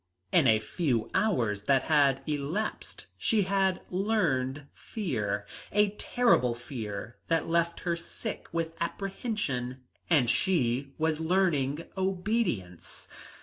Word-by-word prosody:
In 160 -7 +5
a 110 -2 +6
few 115 +1 -1
hours 120 - +1
that 135 +1 +4
had 140 -4 +3
elapsed 155 +8 -3
she 215 -3 +2
had 190 -1 +1
learned 155 -9 0
fear, 105 - -3 0.3
a 210 0 +4
terrible 210 - +2
fear 115 -3 -6
that 165 -1 +1
left 170 0 +1
her 175 -2 0
sick 170 - -6
with 165 -1 -2
apprehension, 170 - -3 0.3
and 145 -8 +4
she 135 -4 +1
was 160 -1 +1
learning 160 -4 +1
obedience. 185 - -2
160 Hz, 110 wpm, -29 LUFS, 125-190 Hz, 0.3 s, a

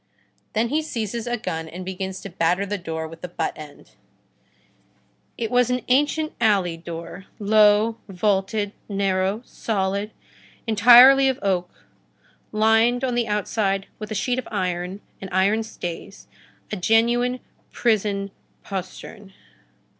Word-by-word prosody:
Then 225 +2 +1
he 305 +4 +1
seizes 235 -6 -4
a 240 0 -1
gun 160 -8 -4
and 180 +3 -8
begins 190 0 -5
to 195 - -7
batter 175 +4 +1
the 205 0 -3
door 160 -2 -4
with 165 +1 -12
the 180 - -5
butt 170 -2 -3
end. 150 -2 -12 1.5
It 225 0 -3
was 245 -1 +3
an 250 0 0
ancient 295 +4 +2
alley 195 -6 +2
door, 170 +3 -8
low, 215 +1 +4
vaulted, 200 +2 0 0.2
narrow, 195 +2 0
solid, 200 -1 -2 0.6
entirely 245 +5 +8
of 260 - -1
oak, 180 -3 -2 0.7
lined 225 +3 +3
on 255 -2 0
the 240 -1 0
inside 205 -2 -1
with 215 -1 -6
a 215 - -4
sheet 245 +5 0
of - - -7
iron 180 -1 -3 0.2
and 190 - -6
iron 195 +4 +2
stays, 175 -6 -7 0.5
a - - -1
genuine 240 +5 +2 0.3
prison 205 -4 0 0.3
postern. 195 +1 -7
205 Hz, 130 wpm, -23 LUFS, 190-230 Hz, 1.5 s, entirely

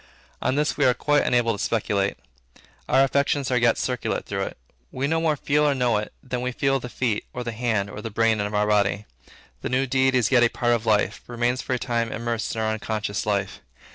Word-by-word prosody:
On 130 - +1
this 150 +1 0
we 145 - +3
are 125 -1 +4
quite 145 +1 +2
unable 120 -2 +2
to 100 - -4
speculate. 100 -3 0 0.7
Our 135 +1 +5
affections 140 0 +1
as 125 - +3
yet 120 -1 +4
circulate 125 -2 -2
through 95 -1 -2
it. - - -8 0.3
We 130 +2 -2
no 160 +3 +1
more 160 -2 +2
feel 150 +1 +1
or 145 -2 +3
know 125 -4 +2
it, 105 - -4
than 125 -1 -3
we 125 0 -1
feel 135 +1 +1
the 125 - -7
feet, 120 -4 -1
or 125 - -4
the 120 - -3
hand, 110 -3 -1
or 100 +1 -8
the 115 - -5
brain 110 0 +2
of 105 +1 -3
our 105 0 +2
body. 105 0 +1 0.6
The - - -3
new 130 +2 +1
deed 130 0 +2
is 120 -5 +2
yet 125 -2 +5
a 120 - +5
part 120 0 +1
of 115 -1 -2
life, 105 -1 +2
remains 120 +1 -1
for 130 - -2
a - - -1
time 115 -1 -1
immersed 115 -1 -3
in 110 - -2
our 110 - +1
unconscious 105 -1 -3
life. 100 -2 -1
120 Hz, 230 wpm, -24 LUFS, 110-130 Hz, 0.7 s, Our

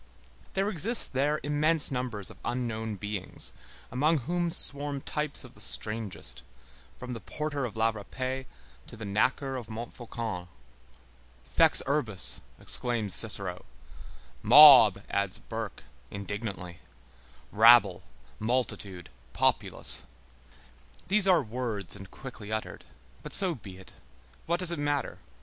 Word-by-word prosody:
There 195 +1 +1
exist 210 - +3
there 145 +3 +1
immense 150 +2 +3
numbers 125 -6 -3
of - - -16
unknown 110 -3 -3
beings, 105 -1 -3 0.4
among 150 +6 +2
whom 175 +1 -1
swarm 145 -3 +2
types 150 0 -4
of - - -14
the - - -14
strangest, 105 - -4 0.6
from 125 0 -7
the 115 - -6
porter 145 +5 -4
of 115 - -7
la 110 +1 +2
Râpée 130 +5 -5 0.4
to - - -12
the 110 - -7
knacker 130 +7 0
of 120 - -11
Montfaucon. 115 -4 -6 1.0
Fex - - +3
urbis, 130 -9 -2 0.2
exclaims 115 -5 -1
Cicero; 100 -5 +1 0.8
mob, 125 -10 +8
adds 100 -2 -1
Burke, 110 -7 -7 0.3
indignantly; 100 -3 -6 0.7
rabble, 110 -4 +6 0.4
multitude, 105 -6 -3 0.2
populace. - - +1 1.1
These 200 0 +4
are 175 -5 +4
words 110 -6 -3
and 95 -1 -11
quickly 110 -5 -10
uttered. 110 0 -5 0.4
But - - -2
so 190 -3 +5
be 100 - -11
it. 95 - -13 0.5
What 170 +1 0
does 180 -1 +6
it 170 - -4
matter? 145 -1 -2
120 Hz, 120 wpm, -28 LUFS, 105-145 Hz, 1.1 s, mob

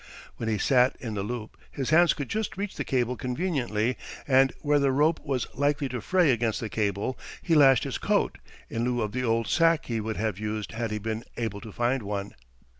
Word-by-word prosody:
When 115 - -2
he 110 - +1
sat 125 +4 +3
in 115 -4 -5
the 100 - -2
loop 110 +1 -5
his 135 0 -3
hands 170 +2 +5
could 145 - -4
just 220 -3 -3
reach 200 0 -4
the - - -2
cable 125 -1 0
conveniently, 125 - -1 0.3
and 135 -1 +5
where 145 -1 +3
the 140 -1 +3
rope 150 +4 +3
was 135 -5 -1
likely 145 +1 +1
to 125 -2 -4
fray 180 - +3
against 115 -2 0
the 115 -4 -4
cable 105 +4 -1 0.2
he 165 - +1
lashed 135 -5 +6
his - - -3
coat, - - 0 0.3
in 115 - -3
lieu 120 -1 0
of 105 - -3
the 130 +3 -2
old 115 -1 +1
sack 165 - +3
he 115 -2 -2
would 110 0 -3
have 105 -3 -2
used 105 0 -3
had 115 0 -3
he 105 - -2
been 110 +2 -3
able 110 -4 -3
to 110 - -9
find 120 +4 0
one. 100 -1 -4
120 Hz, 215 wpm, -27 LUFS, 110-140 Hz, 0.3 s, lashed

